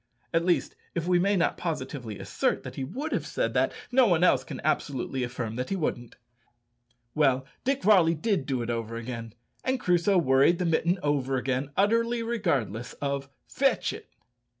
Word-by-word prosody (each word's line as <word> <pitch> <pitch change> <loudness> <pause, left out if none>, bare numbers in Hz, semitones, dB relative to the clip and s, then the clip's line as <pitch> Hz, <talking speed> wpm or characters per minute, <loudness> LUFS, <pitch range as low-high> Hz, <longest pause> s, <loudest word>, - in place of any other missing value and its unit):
At 165 0 +3
least, 180 -1 +1 0.2
if 170 -1 -1
we 180 -1 +4
may 200 +3 +2
not 175 - +1
positively 130 - -4
assert 95 - -1
that - - -7
he 135 - -4
would 265 - -4
have - - -1
said - - -1
that, - - +2 0.2
no 255 -1 +5
one 175 -3 +3
else 180 - +4
can 135 - -7
absolutely 135 -3 -1
affirm 120 -2 -4
that 125 - -3
he 195 - 0
wouldn't. 120 -9 -3 1.0
Well, 135 -3 +2 0.2
Dick 275 +1 0
Varley 180 -5 +5
did 175 - -1
do 130 -3 -1
it 120 - -2
over 115 -1 -3
again, 115 -1 -6 0.3
and 260 0 0
Crusoe 180 0 +3
worried 135 +2 +4
the 180 - -1
mitten 170 +2 +2
over 140 -2 0
again, 130 +2 -1
utterly 230 +3 +2
regardless 140 - -1
of 140 -1 -3 0.2
"Fetch - - +1
it." - - -10
150 Hz, 175 wpm, -27 LUFS, 130-185 Hz, 1.0 s, no